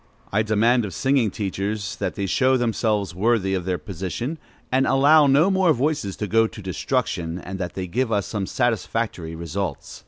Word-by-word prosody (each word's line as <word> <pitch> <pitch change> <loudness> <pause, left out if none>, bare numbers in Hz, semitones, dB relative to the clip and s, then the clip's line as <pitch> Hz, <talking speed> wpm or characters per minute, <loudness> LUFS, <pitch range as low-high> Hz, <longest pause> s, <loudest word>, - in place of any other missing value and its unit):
I 105 - +2
demand 110 +3 +2
of 95 -6 -5
singing 130 - +2
teachers 100 0 -3
that - - -3
they 100 - -2
show 130 +7 +3
themselves 110 -5 0
worthy 100 0 +1
of 90 -2 -2
their 90 -1 0
position, 100 - -5 0.3
and 130 +1 +2
allow 145 +3 +5
no 150 +8 +4
more 190 -4 +4
voices 135 -7 -1
to 105 - -4
go 115 +3 +3
to 115 - -11
destruction, 95 -3 -2
and 95 +1 -7
that 90 -2 -4
they 95 - -3
give 115 +7 -1
us 100 -3 +1
some 100 -3 -3
satisfactory 110 -7 -1
results. 85 -1 -5
105 Hz, 180 wpm, -23 LUFS, 95-125 Hz, 0.3 s, allow